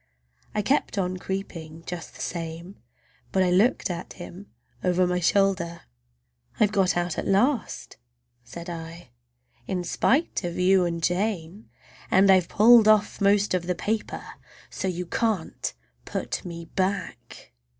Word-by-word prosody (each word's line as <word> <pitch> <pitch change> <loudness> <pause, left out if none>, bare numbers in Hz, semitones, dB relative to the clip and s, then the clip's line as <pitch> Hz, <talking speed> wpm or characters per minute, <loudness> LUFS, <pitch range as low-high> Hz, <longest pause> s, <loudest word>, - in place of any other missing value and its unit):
I 210 - +1
kept 270 -2 +1
on 185 -1 -1
creeping 165 -4 -6
just 175 -2 -7
the - - -9
same, 170 +2 -6 0.5
but 190 - +3
I 180 - +2
looked 200 +2 +3
at 170 0 -6
him 185 +2 -10 0.4
over 180 0 +3
my 180 0 0
shoulder. 180 -2 +1 0.8
"I've 210 -1 +4
got 190 -4 +2
out 175 -1 -1
at - - -3
last," 230 +6 0 0.5
said 170 +8 -9
I, 165 0 -8 0.6
"in 180 -2 -2
spite 270 - +1
of 175 -1 -4
you 185 0 +4
and 170 -1 -3
Jane! 185 +1 -2 0.4
And 195 +1 +5
I've 185 -3 +4
pulled 225 +1 +7
off 215 -2 +3
most 200 0 +3
of 180 -1 -1
the 180 - 0
paper, 215 +3 -3 0.5
so - - -3
you 180 -1 -2
can't 205 -2 -1 0.3
put - - -4
me 170 -1 -7
back!" 190 +3 -4
185 Hz, 140 wpm, -25 LUFS, 170-200 Hz, 0.8 s, pulled